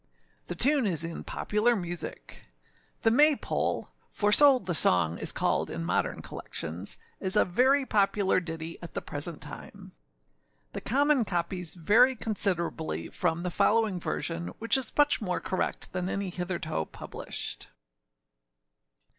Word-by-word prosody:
The 175 - -6
tune 270 - +3
is 165 -5 +4
in 165 0 -6
Popular 220 +3 0
Music. 175 -4 -5 0.6
The 225 - +4
May 295 +5 +5
pole, - - -3 0.2
for 205 0 0
so 280 +4 +7
the 185 -7 -4
song 85 - +2
is - - +2
called - - -1
in 85 0 -5
modern - - -1
collections, 85 +5 -3 0.2
is 190 +1 0
a 210 - +4
very 260 +9 +2
popular 200 -3 +1
ditty 165 -1 -7
at 170 - -10
the - - -2
present 150 +2 -3
time. - - -11 0.8
The - - -5
common 285 +1 +2
copies 180 -2 0
vary 220 +10 +4
considerably 170 - -2
from 170 -1 -2
the 180 - -2
following 215 -1 +1
version, 170 0 -3
which 230 +3 +4
is 265 -2 +3
much 290 -4 +3
more 180 -4 -2
correct 185 - -2
than 180 0 -2
any 195 -2 -3
hitherto 175 - -3
published. - - -6
185 Hz, 140 wpm, -28 LUFS, 170-225 Hz, 0.8 s, so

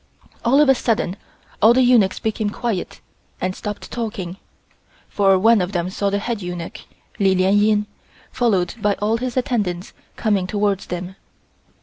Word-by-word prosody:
All 260 +4 +4
of 300 - +5
a 270 - +7
sudden 225 -7 -1 0.5
all 225 +3 +6
the 260 - +5
eunuchs 235 -6 +4
became 220 -1 -1
quiet 205 -3 -3 0.4
and 185 +1 -2
stopped 210 -1 -6
talking, 195 -6 -4 0.7
for 195 -2 +3
one 225 +2 +4
of 180 +3 -3
them 175 0 -1
saw 200 +1 -1
the 200 - 0
head 225 +1 -3
eunuch, 175 -2 -6 0.4
Li 195 -2 +3
Lien 185 +2 +3
Ying, 210 0 +3 0.5
followed 195 -8 +1
by 205 -1 +2
all 215 +2 0
his 250 +1 -4
attendants 205 -8 -1 0.2
coming 200 -5 +1
towards 200 -1 -1
them. 180 +2 -6
205 Hz, 155 wpm, -21 LUFS, 185-230 Hz, 0.7 s, a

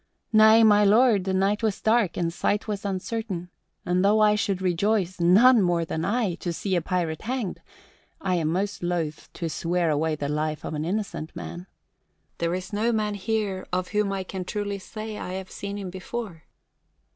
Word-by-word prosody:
"Nay, 220 +1 +7
my 210 -1 +6
lord, 210 -1 +4
the 190 - 0
night 195 +3 +1
was 215 -3 0
dark 220 -4 +2
and 170 -1 -1
sight 205 +4 0
was 205 -1 -4
uncertain; 190 -2 -3 0.3
and 180 +1 +1
though 210 +2 +4
I 210 -1 +5
should 200 -3 0
rejoice 185 +1 0
none 215 +8 +6
more 175 -2 +1
than 160 0 -3
I! 210 -1 0
to 175 - -3
see 190 +3 -2
a 175 - +2
pirate 170 -4 -2
hanged, 235 -4 -3 0.6
I 190 -1 -1
am 165 -3 +1
most 195 +5 -1
loath 170 -4 -3
to 170 - -4
swear 170 +1 0
away 155 +1 0
the 145 -1 -3
life 150 +1 -2
of - - -4
an 155 0 -2
innocent 185 -4 -3
man. 175 +2 -7 0.7
There 170 +1 0
is 185 +2 -6
no 220 +3 +1
man 215 -2 0
here 205 -2 -2
of 180 0 -1
whom 210 -1 0
I 195 -1 -2
can 185 0 -5
truly 205 +1 -3
say 215 +2 -7
I 180 - -5
have 190 0 -6
seen 200 0 -5
him 190 -3 -5
before." 190 -2 -6
190 Hz, 190 wpm, -25 LUFS, 175-210 Hz, 0.7 s, Nay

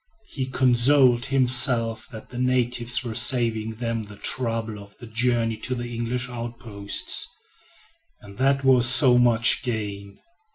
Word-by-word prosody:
He 130 -2 -4
consoled 125 0 +3
himself 125 -4 +1
that 110 - -12
the 125 - -8
natives 125 -1 0
were 120 -3 -5
saving 110 -2 0
them 115 0 -3
the 105 -1 -11
trouble 115 -1 -3
of 100 0 -15
the 120 - -12
journey 115 0 -1
to 125 +3 -3
the 120 0 -6
English 120 +2 -3
outposts, 115 -4 -2 0.9
and 100 +2 -15
that 135 +1 +1
was 130 -2 +4
so 125 0 +5
much 120 -1 +3
gain. 100 -4 -5
120 Hz, 135 wpm, -23 LUFS, 110-125 Hz, 0.9 s, so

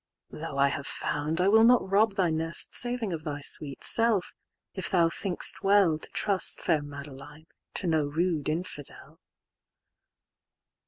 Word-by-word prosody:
"Though 155 -2 -7
I 140 0 +3
have 140 -1 -5
found, 150 +3 -2
I 180 - +2
will 220 +2 +5
not 240 -3 +4
rob 200 +1 +2
thy 180 -4 +1
nest"Saving 190 +7 -1
of 155 -1 -6
thy 145 -2 -5
sweet 145 -1 +1
self; 225 -5 +2 0.4
if 190 - -4
thou 170 -3 +3
think'st 180 +1 0
well"To 195 -6 +2
trust, 200 -3 +1
fair 160 -4 0
Madeline, 145 +1 -11 0.3
to - - -2
no 160 -4 +1
rude 160 0 -1
infidel." 155 -3 -7
165 Hz, 140 wpm, -27 LUFS, 150-195 Hz, 0.4 s, will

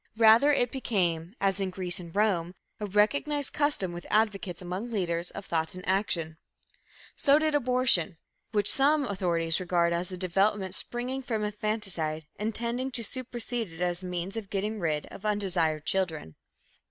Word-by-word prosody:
Rather, 230 +6 +7
it 245 -4 +2
became, 180 -8 -1
as 195 0 +1
in 195 -1 -1
Greece 185 -1 -2
and 170 -1 -10
Rome, 190 -4 +1 0.2
a 210 - -3
recognized 280 +8 +1
custom 290 -11 +1
with 175 0 -8
advocates 205 -5 +1
among 185 +6 -4
leaders 175 -5 -1
of 200 - -8
thought 160 +1 -1
and 185 - -9
action. 175 -5 0 0.8
So 280 0 +5
did 310 0 +1
abortion, 250 - +3 0.3
which 205 -2 +1
some 285 +1 +3
authorities 170 -5 0
regard 175 -2 +1
as 175 +2 -2
a 185 - -5
development 190 +1 +1
springing 250 +6 -1
from 225 -4 -2
infanticide 200 -7 -2
and 215 +1 -2
tending 240 +3 -1
to 235 - +1
supersede 240 -5 -3
it 165 - -12
as 175 0 0
a 185 - -6
means 180 +3 -3
of 220 -4 -5
getting 210 +2 -2
rid 155 -4 -1
of 195 - -10
undesired 175 -7 0
children. 165 - -1
195 Hz, 165 wpm, -28 LUFS, 175-230 Hz, 0.8 s, Rather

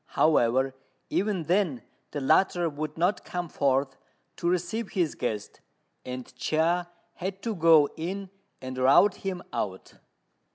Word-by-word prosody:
However, 130 -3 +3 0.4
even 195 -4 0
then 170 - +1 0.3
the 145 - -4
latter 170 +4 +3
would 155 0 -5
not 180 +5 +1
come 175 -1 -4
forth 135 -2 0 0.4
to 170 - 0
receive 180 +5 -2
his 175 -5 +1
guest, 105 -4 -4 0.4
and 125 -1 -6
Chia 170 +6 +1 0.2
had 190 +2 -5
to 230 - -1
go 160 -5 +6
in 190 +4 -5 0.3
and 130 0 -5
rout 140 +11 +5
him 185 -2 -4
out. 95 -2 -4
165 Hz, 130 wpm, -27 LUFS, 135-180 Hz, 0.4 s, go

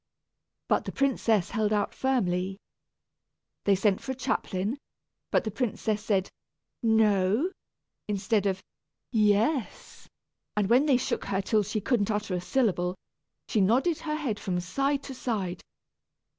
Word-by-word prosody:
But - - +2
the - - -4
princess 230 -8 +1
held 215 -2 +1
out 210 -1 +1
firmly. 190 -8 0 1.1
They 200 - +5
sent 195 0 +2
for 265 - -3
a - - -10
chaplain, 215 -1 -2 0.5
but - - +2
the 220 - -3
princess 215 -2 -1
said 195 -3 0 0.5
"no," 220 - +3 0.6
instead 205 0 +1
of 190 -1 -2 0.5
"yes," 220 +4 +1 0.5
and 210 0 +1
when 260 +5 +5
they 270 -4 +5
shook 255 - -2
her 195 -1 -1
till 210 +2 +2
she 210 +1 -2
couldn't 225 -3 +1
utter 210 -2 -1
a 180 - -1
syllable, 180 -3 +1 0.5
she 215 - +1
nodded 260 - +3
her 305 -2 -2
head 260 -10 -2
from 180 -3 -1
side 275 +10 0
to 270 - -7
side. 200 -8 -3
215 Hz, 140 wpm, -28 LUFS, 195-250 Hz, 1.1 s, They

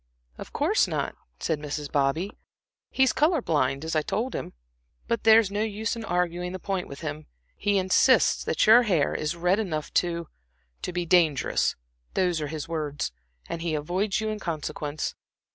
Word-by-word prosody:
"Of - - -8
course - - +2
not," - - -2 0.2
said 160 -2 -1
Mrs. 150 -1 -5
Bobby. 145 +8 +1 0.6
"He 265 - +2
is 265 - +3
color 310 +4 +3
blind, 145 - 0
as 160 - -2
I 155 - +3
told 230 +11 -2
him. - - -5 0.5
But 230 -2 -1
there's 220 -2 +6
no 205 +1 -1
use 220 +1 -2
in 230 - -6
arguing 180 -1 -1
the 185 - -5
point 190 -1 -2
with 140 - -9
him. 155 -1 -5 0.3
He 205 0 +1
insists 185 -1 +4
that - - +2
your 225 +3 +8
hair 180 - +1
is 155 +2 -2
red 180 +4 +2
enough 160 -8 -3
to 170 -2 -4 0.5
to - - -3
be 175 0 -2
dangerous 165 -5 +3 0.4
those 180 -4 +1
are 150 - -2
his 155 0 -5
words, 150 - -3 0.4
and 165 - -4
he 165 -2 -1
avoids 185 +8 -1
you 220 0 -1
in 215 0 -3
consequence. 155 -3 -3
175 Hz, 180 wpm, -26 LUFS, 155-205 Hz, 0.6 s, your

